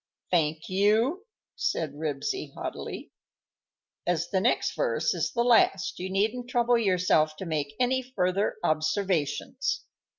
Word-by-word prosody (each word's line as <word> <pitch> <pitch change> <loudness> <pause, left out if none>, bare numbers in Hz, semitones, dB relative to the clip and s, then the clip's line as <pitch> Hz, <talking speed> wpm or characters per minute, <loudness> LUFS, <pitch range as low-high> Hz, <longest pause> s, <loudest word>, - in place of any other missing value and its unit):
"Thank 160 -2 +1
you," 220 - +2 0.3
said 155 -4 -1
Ribsy, 145 -1 -3
haughtily. - - -6 1.0
"As 175 -1 0
the 190 - +2
next - - +1
verse - - +1
is - - -1
the 235 - +1
last 230 -5 +3
you 185 +1 -4
needn't 220 +6 0
trouble 240 -1 +3
yourself 180 -6 +2
to 190 - -7
make 150 -4 -2
any 255 +1 +2
further 200 -6 0
observations." 155 - 0
190 Hz, 125 wpm, -27 LUFS, 155-235 Hz, 1.0 s, last